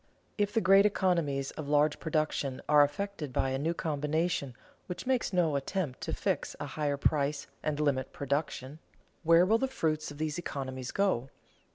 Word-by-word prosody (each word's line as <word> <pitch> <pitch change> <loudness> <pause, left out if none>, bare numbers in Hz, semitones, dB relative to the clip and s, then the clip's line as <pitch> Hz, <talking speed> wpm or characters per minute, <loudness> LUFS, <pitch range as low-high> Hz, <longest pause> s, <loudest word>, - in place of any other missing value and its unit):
_ - - -41 0.3
If 205 -1 0
the 225 - +1
great 195 +3 +6
economies 170 -9 0
of 155 -3 -7
large 150 0 +3
production 155 -4 -1
are 150 -1 +7
effected 150 0 -3
by 130 +1 0
a 135 - -1
new 165 +4 0
combination 150 -3 -1 0.3
which 180 - -6
makes 255 -4 +1
no 170 -5 +2
attempt 140 0 -2
to - - -3
fix - - -1
a - - -3
higher 145 -2 -2
price 145 0 +1 0.2
and 150 -1 -2
limit 140 -4 0
production, 140 0 -3 0.4
where 165 +1 +6
will 220 +4 +3
the 265 - +1
fruits 155 -11 -1
of 145 - -9
these 155 +1 -2
economies 130 -5 -5
go? 185 -11 0
150 Hz, 175 wpm, -30 LUFS, 140-175 Hz, 0.4 s, are